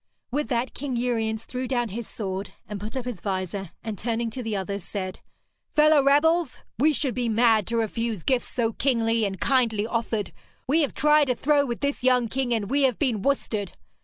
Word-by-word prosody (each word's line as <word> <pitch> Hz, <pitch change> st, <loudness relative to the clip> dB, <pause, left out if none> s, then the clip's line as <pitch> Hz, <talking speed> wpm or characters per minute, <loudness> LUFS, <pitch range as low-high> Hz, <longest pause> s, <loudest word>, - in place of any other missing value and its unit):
With 295 Hz, +3 st, -1 dB
that 245 Hz, 0 st, -1 dB
King 270 Hz, -2 st, -4 dB
Uriens 225 Hz, -2 st, -1 dB
threw 255 Hz, 0 st, -4 dB
down 240 Hz, -3 st, 0 dB
his 225 Hz, +3 st, -5 dB
sword 195 Hz, -2 st, -4 dB
and 210 Hz, -1 st, -5 dB
put 215 Hz, +6 st, -5 dB
up 255 Hz, -, -4 dB
his 245 Hz, -7 st, -4 dB
vizor, 190 Hz, -1 st, -3 dB
and 220 Hz, -3 st, -5 dB
turning 230 Hz, 0 st, -1 dB
to 255 Hz, -, -5 dB
the 225 Hz, -3 st, -3 dB
others, 200 Hz, 0 st, -3 dB
said: 185 Hz, -1 st, -5 dB, 0.6 s
'Fellow 305 Hz, -1 st, +6 dB
rebels, 295 Hz, +2 st, +3 dB, 0.2 s
we 305 Hz, +4 st, +5 dB
should 280 Hz, -3 st, -1 dB
be 245 Hz, 0 st, -1 dB
mad 225 Hz, -2 st, +3 dB
to 230 Hz, -, -1 dB
refuse 225 Hz, -3 st, -2 dB
gifts 255 Hz, -2 st, +1 dB
so 230 Hz, -2 st, -1 dB
kingly 230 Hz, -4 st, +1 dB
and 195 Hz, -2 st, -3 dB
kindly 230 Hz, -6 st, +2 dB
offered. 225 Hz, -3 st, -2 dB, 0.3 s
We 305 Hz, +5 st, +3 dB
have 285 Hz, -, -1 dB
tried 300 Hz, -1 st, +4 dB
a 250 Hz, -, +2 dB
throw 285 Hz, +2 st, +2 dB
with 235 Hz, -1 st, -4 dB
this 280 Hz, -2 st, -1 dB
young 250 Hz, -2 st, +3 dB
king, 260 Hz, 0 st, -1 dB
and 220 Hz, -4 st, 0 dB
we 280 Hz, +6 st, +1 dB
have 260 Hz, -5 st, +3 dB
been 240 Hz, -8 st, 0 dB
worsted. 215 Hz, -6 st, -1 dB
235 Hz, 200 wpm, -25 LUFS, 215-265 Hz, 0.6 s, Fellow